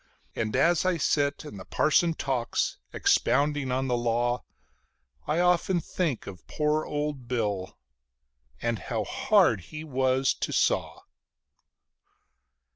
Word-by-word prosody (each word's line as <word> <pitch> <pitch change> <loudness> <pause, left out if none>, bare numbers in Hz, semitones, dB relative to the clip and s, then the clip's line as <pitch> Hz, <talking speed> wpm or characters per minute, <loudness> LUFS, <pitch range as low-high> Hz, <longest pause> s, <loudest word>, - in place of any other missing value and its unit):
And 110 0 -2
as 170 +5 +3
I 185 -2 +1
sit 145 -1 0
and 105 -10 -9
the - - -8
parson 165 +2 +2
talks, 130 -5 -1
expounding 145 -1 +1
of 130 +1 0
the 125 - +1
Law, 120 +1 0 0.8
I 155 +3 +1
often 180 0 +2
think 160 -5 -2
of 95 -2 -10
poor 150 0 0
old 145 -4 -3
Bill 105 -6 -2 0.9
and 115 -2 0
how 110 -3 -3
hard 175 - +3
he 155 0 -8
was 130 -2 +1
to - - -4
saw. - - 0
135 Hz, 120 wpm, -27 LUFS, 120-155 Hz, 0.9 s, as